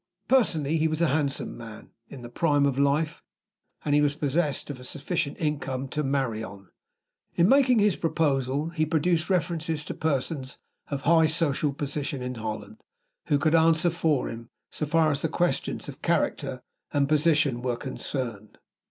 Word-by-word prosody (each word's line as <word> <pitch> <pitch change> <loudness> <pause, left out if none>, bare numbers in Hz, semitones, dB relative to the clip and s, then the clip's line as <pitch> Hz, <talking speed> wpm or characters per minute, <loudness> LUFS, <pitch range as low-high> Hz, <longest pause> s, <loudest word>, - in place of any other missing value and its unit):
Personally 165 - +2
he 160 +1 +2
was 155 0 -2
a 170 -3 +3
handsome 140 -1 -1
man, 115 -2 -11 0.2
in 130 -3 -10
the - - -6
prime 145 +1 +2
of 140 -1 0
life; 145 +3 +1 0.6
and 145 - +1
he 145 - +5
was 145 -1 +2
possessed 150 0 -1
of 135 - -8
a - - -11
sufficient 150 +3 -3
income 140 -4 -2
to 150 - -2
marry 135 -5 -1
on. 100 -2 -10 0.7
In 170 - +4
making 260 -1 +5
his 205 -4 +3
proposal, 145 -2 0
he 165 -2 -1
produced 160 +2 +1
references 165 -3 0
to - - -4
persons 140 -2 -2 0.3
of 140 -1 -3
high 160 +1 +5
social 155 -2 +1
position 140 0 -3
in 125 0 -3
Holland, 115 - -6 0.5
who 145 - +3
could 155 +2 +1
answer 165 +1 +4
for 160 -4 +1
him, 115 +1 -8 0.2
so 150 - -3
far 160 0 +3
as 145 -1 0
the 160 - 0
questions 175 +2 -1
of - - -9
character - - -1 0.3
and 140 -1 +2
position 150 -4 +2
were 125 -1 -1
concerned. 120 -5 -5
150 Hz, 170 wpm, -26 LUFS, 135-165 Hz, 0.7 s, he